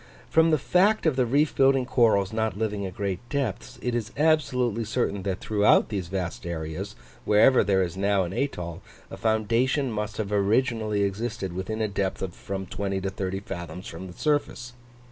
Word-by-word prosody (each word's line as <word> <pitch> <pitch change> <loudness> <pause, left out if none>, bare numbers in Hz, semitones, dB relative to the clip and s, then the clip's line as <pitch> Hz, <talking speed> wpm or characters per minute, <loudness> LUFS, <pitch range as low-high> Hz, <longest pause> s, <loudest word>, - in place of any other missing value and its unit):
From 160 0 +5
the 155 - +4
fact 190 +9 +2
of 155 -5 +3
the 130 -2 +2
reef 145 +5 +2
building 135 -1 +4
corals 110 -5 +3
not 110 -2 -1
living 105 -2 -2
at 95 - -9
great 100 -2 -2
depths, 135 -8 -3
it 125 - -1
is 115 -2 -2
absolutely 125 -7 +2
certain 110 -3 -1
that 95 -1 -2
throughout 105 -1 +3
these 100 -5 -3
vast 90 -1 -4
areas, 80 -2 -5 0.3
wherever 110 +5 +5
there 95 -2 +2
is 85 -1 -4
now 100 0 +2
an 90 +1 -5
atoll, 90 -9 -3 0.3
a - - -5
foundation 115 +5 +1
must 105 0 -3
have 105 -2 -3
originally 105 0 +1
existed 100 -2 -3
within 95 +5 -3
a - - +1
depth 100 -2 -2
of 95 -2 -4
from 95 +1 -5
20 100 +1 -3
to 95 0 -3
30 95 0 -3
fathoms 90 -2 -7
from 90 +3 -7
the 90 - -10
surface. 145 -5 -1
105 Hz, 185 wpm, -26 LUFS, 95-125 Hz, 0.3 s, From